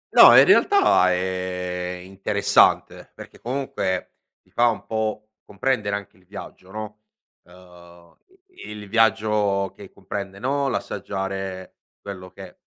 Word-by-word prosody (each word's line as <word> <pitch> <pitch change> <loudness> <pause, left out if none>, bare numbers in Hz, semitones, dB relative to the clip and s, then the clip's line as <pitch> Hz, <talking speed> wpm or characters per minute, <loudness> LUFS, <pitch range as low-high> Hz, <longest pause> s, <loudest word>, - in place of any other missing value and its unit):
No, - - +10
in - - +9
realtà 390 - +4
è 90 -1 -3
interessante, 95 +1 +1
perché - - -13
comunque 125 -8 -3 0.3
ti - - -32
fa 120 0 +3
un 115 - -2
po' 110 -1 -3
comprendere 105 -1 -1
anche 100 -2 -8
il 90 - -26
viaggio, 95 -1 -11
no? 105 +1 -7 0.5
Uhm, 90 -1 -18 0.3
i 370 - -12
il 105 -1 -8
viaggio 105 -3 +1
che 100 -2 -12
comprende, 100 0 -7
no, 140 +5 -1
l'assaggiare 95 -6 -4 0.2
quello 95 -2 -9
che - - -13
100 Hz, 125 wpm, -23 LUFS, 95-110 Hz, 0.5 s, No